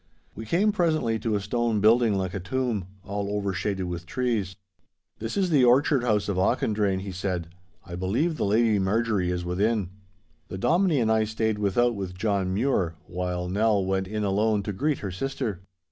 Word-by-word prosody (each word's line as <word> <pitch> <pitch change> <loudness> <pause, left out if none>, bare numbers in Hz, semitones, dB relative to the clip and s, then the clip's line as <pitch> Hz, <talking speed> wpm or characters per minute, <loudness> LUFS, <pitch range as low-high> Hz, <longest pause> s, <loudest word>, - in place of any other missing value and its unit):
We 110 +1 -8
came 195 - +3
presently 155 - +1
to 110 0 -1
a - - +1
stone 115 +2 0
building 110 0 +4
like 95 -1 -2
a 100 - -3
tomb, 115 -1 -2 0.2
all 100 0 -3
overshaded 100 -1 -2
with 85 -1 -5
trees. 110 -7 -1 0.6
'This 115 - -4
is 190 -2 +2
the 140 -5 +5
orchard 130 +2 +4
house 105 -4 +1
of 100 -3 -1
Auchendrayne,' 100 0 +1
he 100 0 -6
said. 90 -2 -3 0.4
'I 85 -2 -7
believe 115 - 0
the - - -2
Lady 110 +1 +3
Marjorie 100 -1 +1
is 90 -1 -2
within.' 100 +2 0 0.6
The 95 - -6
Dominie 170 - +2
and 110 -1 +2
I 110 -1 +3
stayed 110 -1 -1
without 120 +4 +2
with 95 -3 -6
John 100 -2 0
Mure, 95 -6 0
while 90 0 -3
Nell 100 +1 +2
went 95 0 -1
in 105 +1 -3
alone 105 +1 +1
to 105 - -3
greet 145 +8 0
her 95 - -3
sister. 110 -2 -3
105 Hz, 180 wpm, -26 LUFS, 95-120 Hz, 0.6 s, the